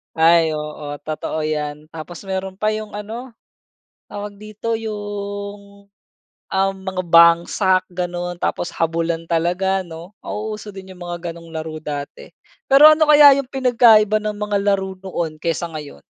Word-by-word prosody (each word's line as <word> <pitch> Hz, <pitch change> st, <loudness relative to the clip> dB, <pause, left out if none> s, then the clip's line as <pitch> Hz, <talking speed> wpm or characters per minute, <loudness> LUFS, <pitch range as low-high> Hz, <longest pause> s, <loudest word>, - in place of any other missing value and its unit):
Ay 165 Hz, 0 st, +5 dB
oo 150 Hz, -1 st, -5 dB, 0.2 s
totoo 155 Hz, 0 st, -3 dB
'yan, 150 Hz, -1 st, -3 dB
tapos 165 Hz, +4 st, -10 dB
meron 190 Hz, 0 st, -4 dB
pa 215 Hz, -, 0 dB
'yong 215 Hz, 0 st, -2 dB
ano, 225 Hz, +5 st, -7 dB, 0.7 s
tawag 205 Hz, 0 st, -8 dB
dito? 215 Hz, +2 st, -4 dB
Yung 205 Hz, -2 st, -7 dB, 0.7 s
uhm, 195 Hz, 0 st, +1 dB
mga 190 Hz, -1 st, -2 dB
bangsak 170 Hz, +2 st, +4 dB
gano'n, 175 Hz, -1 st, -4 dB
tapos 175 Hz, -, -2 dB
habulan 165 Hz, 0 st, -1 dB
talaga 180 Hz, +3 st, 0 dB
'no. 170 Hz, +2 st, -10 dB
Nauuso 215 Hz, 0 st, -5 dB
din 190 Hz, -1 st, -10 dB
yung 180 Hz, -, -17 dB
mga 175 Hz, -1 st, -5 dB
gano'ng 165 Hz, 0 st, -13 dB
laro 160 Hz, -1 st, -6 dB
dati. 145 Hz, -2 st, -6 dB, 0.4 s
Pero 275 Hz, +3 st, +8 dB
ano 310 Hz, -1 st, +2 dB
kaya 290 Hz, -2 st, +9 dB
yung 255 Hz, -, -16 dB
pinagkaiba 230 Hz, -5 st, +4 dB
ng 210 Hz, -1 st, -3 dB
mga 210 Hz, -1 st, -1 dB
laro 195 Hz, -1 st, 0 dB
noon 170 Hz, -5 st, -4 dB
kaysa 170 Hz, +1 st, -1 dB
ngayon? 145 Hz, -, -9 dB
190 Hz, 140 wpm, -20 LUFS, 165-210 Hz, 0.7 s, kaya